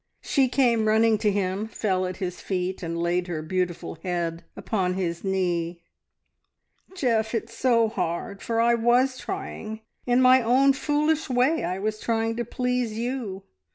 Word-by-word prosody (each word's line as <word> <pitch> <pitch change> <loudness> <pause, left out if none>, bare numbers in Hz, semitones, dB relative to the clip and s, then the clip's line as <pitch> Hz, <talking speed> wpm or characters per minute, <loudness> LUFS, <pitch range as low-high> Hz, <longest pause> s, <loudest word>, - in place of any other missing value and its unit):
She 270 -3 +2
came 235 -4 +2
running 220 0 +4
to 215 -1 +2
him, 195 +1 -1
fell 185 -4 -1
at 180 - -6
his 180 -2 -4
feet, 185 -1 -2
and 170 -1 -3
laid 175 +1 0
her 160 -3 -4
beautiful 175 -1 -3
head 170 -2 -2
upon 185 -4 -1
his 170 -3 -2
knee. 175 -3 -1 1.2
"Geoff, 230 -8 +1
it's 225 +1 -3
so 235 -3 +3
hard, 185 -1 -3
for 230 -1 -1
I 235 +1 +4
was 245 +3 +2
trying! 220 - -6 0.3
In 245 0 +4
my 255 0 +6
own 260 +4 +4
foolish 300 +3 0
way 255 +6 +2
I 180 +2 -2
was 215 +2 -2
trying 225 0 0
to 240 - 0
please, 250 -2 -1
you. 230 -5 -3
220 Hz, 155 wpm, -25 LUFS, 185-245 Hz, 1.2 s, my